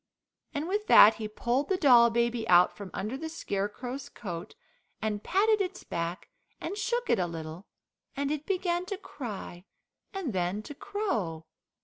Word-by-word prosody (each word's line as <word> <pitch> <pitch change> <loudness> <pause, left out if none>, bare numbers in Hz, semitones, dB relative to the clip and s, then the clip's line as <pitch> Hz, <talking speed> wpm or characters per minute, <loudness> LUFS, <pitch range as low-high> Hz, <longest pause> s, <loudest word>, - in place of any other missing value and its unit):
And 295 +3 -2
with 415 +3 -1
that 215 +1 +8
he 215 - -2
pulled 240 +6 -1
the 380 - +2
doll 245 -8 +7
baby 235 0 0
out 175 0 +6
from 200 -2 -8
under 215 +6 -3
the 320 +4 -5
Scarecrow's 245 0 -4
coat, 175 - -7 0.4
and 210 -1 -2
patted 420 +3 +3
its 370 -1 -3
back, 170 +2 -4 0.3
and - - -4
shook 480 +3 -1
it - - +3
a 180 - +1
little, 165 +2 -7 0.5
and 280 0 0
it 305 0 -3
began 360 -2 0
to 400 - -3
cry, 215 - -7 0.5
and 370 - -3
then 185 +3 -1
to 290 - -8
crow. 235 - -3
240 Hz, 160 wpm, -29 LUFS, -, 0.5 s, that